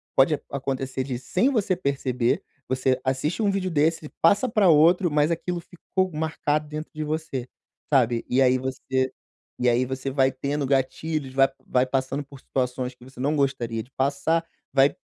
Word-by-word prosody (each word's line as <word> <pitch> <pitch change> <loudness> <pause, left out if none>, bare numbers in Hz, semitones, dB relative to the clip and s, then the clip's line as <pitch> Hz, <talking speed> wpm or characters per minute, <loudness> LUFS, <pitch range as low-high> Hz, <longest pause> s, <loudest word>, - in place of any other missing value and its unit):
pode 140 +3 +4
acontecer 135 -1 -2
de, 130 -2 -3
sem 185 - +1
você 210 -8 +1
perceber, 135 -2 0 0.2
você 130 0 +1
assiste 135 - -1
um 205 - +3
vídeo 190 -2 -1
desse, 155 0 +1
passa 200 +9 +4
pra 210 -4 +4
outro, 170 +3 +5
mas 150 +2 +2
aquilo 170 +1 -2
ficou 185 +2 -2
marcado 155 -1 -1
dentro 155 +1 -6
de 155 0 -4
você, 150 -5 -3 0.4
sabe? 120 -4 +3
E 125 - +2
aí, 130 -1 +5
você 130 0 -1 0.5
e 125 - +3
aí, 120 +1 +3
você 130 +1 -4
vai 135 -1 +2
tendo 140 +2 -2
gatilhos, 135 +1 -1
vai 135 0 +5 0.2
vai 125 0 +3
passando 135 +2 -1
por 140 -1 -14
situações 125 -1 -2
que 125 - -17
você 130 0 -12
não 145 +3 +1
gostaria 120 -5 0
de 125 - -19
passar, 140 +5 +1 0.3
vai 135 +1 +4
140 Hz, 170 wpm, -25 LUFS, 130-160 Hz, 0.5 s, outro